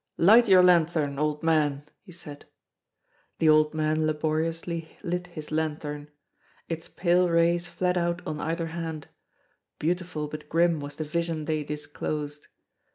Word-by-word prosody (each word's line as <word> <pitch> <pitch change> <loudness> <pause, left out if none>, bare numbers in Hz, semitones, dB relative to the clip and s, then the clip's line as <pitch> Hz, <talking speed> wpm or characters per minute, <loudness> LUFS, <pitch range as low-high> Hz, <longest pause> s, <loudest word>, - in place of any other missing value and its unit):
"Light 225 +7 +6
your 185 -2 +7
lanthorn, 160 -5 +3
old 150 +1 -1
man," 150 -3 +1 0.2
he 190 - -15
said. 150 -4 -11 0.9
The 160 - +2
old 155 0 +4
man 155 0 +1
laboriously 160 +2 -2
lit 180 -1 -3
his 155 -3 -9
lanthorn. 150 -1 -3 0.6
Its 165 -1 -5
pale 180 0 +2
rays 170 +1 +2
fled 180 +1 0
out 170 0 -1
on 150 - -4
either 165 +1 -2
hand; 160 -3 -5 0.7
beautiful 170 -2 -2
but 150 0 -9
grim 170 -1 +2
was 145 0 -7
the 155 - -3
vision 165 0 -2
they 155 -1 -1
disclosed. 150 0 -5
160 Hz, 140 wpm, -27 LUFS, 150-170 Hz, 0.9 s, your